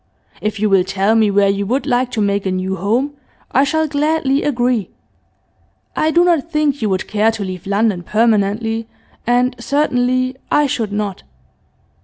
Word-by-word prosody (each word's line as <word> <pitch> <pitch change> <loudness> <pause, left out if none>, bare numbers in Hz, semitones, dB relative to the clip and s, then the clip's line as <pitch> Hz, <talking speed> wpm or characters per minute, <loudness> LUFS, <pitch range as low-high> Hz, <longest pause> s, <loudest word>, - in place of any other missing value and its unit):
If 215 0 -2
you 215 - +2
will 195 -2 +4
tell 195 +3 +1
me 220 -2 +3
where 200 0 +3
you 200 0 -1
would 260 +6 0
like 250 -2 +1
to 220 - 0
make 200 -1 0
a - - 0
new 185 +1 -2
home 235 +10 0 0.4
I 270 - +4
shall 315 +3 +1
gladly 290 -1 +1
agree. 245 -7 0 1.1
I 310 - +1
do 345 +2 +4
not 335 -2 +1
think 300 -3 0
you 215 - 0
would 190 -1 -1
care 215 +1 +2
to 225 -2 -3
leave 185 -1 -6
London 200 -2 +1
permanently, 220 +2 0 0.4
and 245 +1 +2
certainly 255 -1 0
I 295 - +3
should 230 -6 -2
not. 205 -2 -3
225 Hz, 170 wpm, -17 LUFS, 200-270 Hz, 1.1 s, will